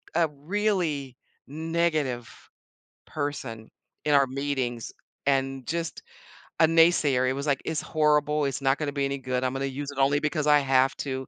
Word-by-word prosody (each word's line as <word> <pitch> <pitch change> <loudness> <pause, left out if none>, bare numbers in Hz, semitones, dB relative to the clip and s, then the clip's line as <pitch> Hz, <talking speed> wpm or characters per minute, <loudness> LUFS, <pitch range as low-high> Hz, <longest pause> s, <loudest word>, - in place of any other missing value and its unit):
a 170 -1 +4
really 155 - -1 0.3
negative 155 -6 -1 0.8
person 130 -7 -5 0.4
in 150 - +2
our 140 -1 +5
meetings 130 -3 -3 0.4
and 135 -1 0
just 165 0 -3 0.6
a - - +8
naysayer, 155 -6 +4
he 130 - +1
was 140 +2 -4
like, 140 -2 +1
"It's 160 -1 -2
horrible, 150 -1 +2
it's 140 0 -2
not 135 0 +2
gonna 150 -2 -2
be 140 -1 -1
any 140 0 -2
good, 130 -1 -2
I'm 130 0 0
gonna 135 0 -2
use 140 +1 -4
it 140 - -12
only 140 +1 +3
because 155 0 -1
I 150 0 +6
have 135 -1 +2
to." 130 -1 -4
140 Hz, 165 wpm, -26 LUFS, 135-155 Hz, 0.8 s, a